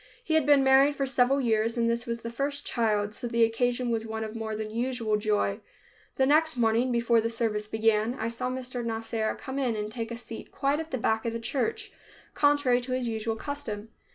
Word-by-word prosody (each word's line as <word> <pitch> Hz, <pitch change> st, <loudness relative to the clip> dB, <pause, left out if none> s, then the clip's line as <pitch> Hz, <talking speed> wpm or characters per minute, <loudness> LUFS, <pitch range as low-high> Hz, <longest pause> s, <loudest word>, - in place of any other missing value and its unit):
He 320 Hz, -, -2 dB
had 315 Hz, -3 st, +3 dB
been 285 Hz, -2 st, +6 dB
married 270 Hz, +2 st, +5 dB
for 275 Hz, -, 0 dB
several 265 Hz, +1 st, +2 dB
years 225 Hz, -2 st, +1 dB
and 230 Hz, 0 st, +2 dB
this 235 Hz, +1 st, -1 dB
was 235 Hz, 0 st, -3 dB
the 230 Hz, -, -5 dB
first 280 Hz, +4 st, -3 dB
child, 210 Hz, -3 st, 0 dB
so 240 Hz, -, -4 dB
the 235 Hz, 0 st, +2 dB
occasion 245 Hz, +2 st, +1 dB
was 225 Hz, -1 st, 0 dB
one 220 Hz, 0 st, -4 dB
of 215 Hz, 0 st, -6 dB
more 220 Hz, -1 st, -3 dB
than 215 Hz, 0 st, -4 dB
usual 235 Hz, -2 st, -1 dB
joy. 210 Hz, -1 st, 0 dB, 0.6 s
The 265 Hz, -, +3 dB
next 310 Hz, +1 st, +3 dB
morning, 235 Hz, +2 st, +2 dB
before 235 Hz, -1 st, +3 dB
the 230 Hz, -, -1 dB
service 220 Hz, -2 st, -1 dB
began, 220 Hz, +1 st, +1 dB
I 225 Hz, -, -3 dB
saw 235 Hz, +2 st, -3 dB
Mr. 255 Hz, -1 st, -4 dB
Nasser 225 Hz, -1 st, -2 dB
come 265 Hz, 0 st, -4 dB
in 250 Hz, -4 st, 0 dB
and 210 Hz, 0 st, -4 dB
take 225 Hz, 0 st, -4 dB
a 235 Hz, -, -5 dB
seat 230 Hz, -1 st, -9 dB
quite 280 Hz, +2 st, 0 dB
at 320 Hz, 0 st, -5 dB
the 260 Hz, -, -2 dB
back 220 Hz, -1 st, 0 dB
of 230 Hz, -, -1 dB
the 230 Hz, -, -3 dB
church, 270 Hz, -, -2 dB, 0.4 s
contrary 285 Hz, -4 st, +3 dB
to 255 Hz, +1 st, -4 dB
his 255 Hz, -1 st, -1 dB
usual 225 Hz, 0 st, -2 dB
custom. 225 Hz, -5 st, -5 dB
235 Hz, 220 wpm, -28 LUFS, 220-260 Hz, 0.6 s, been